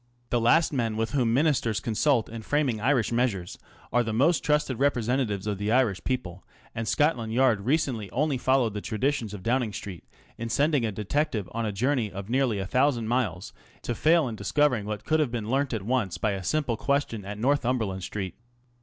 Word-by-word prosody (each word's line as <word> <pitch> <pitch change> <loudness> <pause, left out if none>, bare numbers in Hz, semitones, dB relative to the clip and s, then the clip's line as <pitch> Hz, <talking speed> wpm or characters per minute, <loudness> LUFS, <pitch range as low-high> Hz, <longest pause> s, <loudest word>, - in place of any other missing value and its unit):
The 120 - +2
last 150 +8 +4
men 115 -5 -1
with 115 0 -1
whom 125 -5 +1
Ministers 125 -5 +2
consult 120 +1 +1
in 115 0 -7
framing 130 -3 0
Irish 125 -2 +2
measures 115 -7 -1 0.3
are 120 - +4
the 115 -2 -2
most 140 +10 +2
trusted 150 -5 +1
representatives 120 -6 0
of 105 -2 -2
the 105 +1 -1
Irish 115 -7 +2
people; 95 -8 -3 0.3
and 115 0 -4
Scotland 120 -3 +1
Yard 120 -4 +3
recently 125 -4 0
only 145 -1 0
followed 130 -4 +2
the 105 - -4
traditions 120 0 -1
of 100 -3 -8
Downing 120 -1 +1
Street 100 -3 -7 0.4
in 115 0 -4
sending 140 -1 +2
a - - -2
detective 110 - -1
on 115 0 -2
a - - -1
journey 120 +1 0
of 100 +2 -7
nearly 130 -4 +2
a 95 - -3
thousand 125 0 +1
miles 110 -7 -1 0.3
to 120 - -2
fail 160 +3 +3
in 115 - -4
discovering 110 +2 +1
what 105 -1 -5
could 155 0 +2
have 150 -5 +2
been 115 -2 -4
learnt 140 +1 +1
at 110 -5 -3
once 115 -6 0
by 110 - 0
a 95 -1 -4
simple 135 - 0
question 140 -5 -1
at 100 +1 -6
Northumberland 120 -6 0
Street. 95 0 -4
115 Hz, 195 wpm, -27 LUFS, 105-135 Hz, 0.4 s, last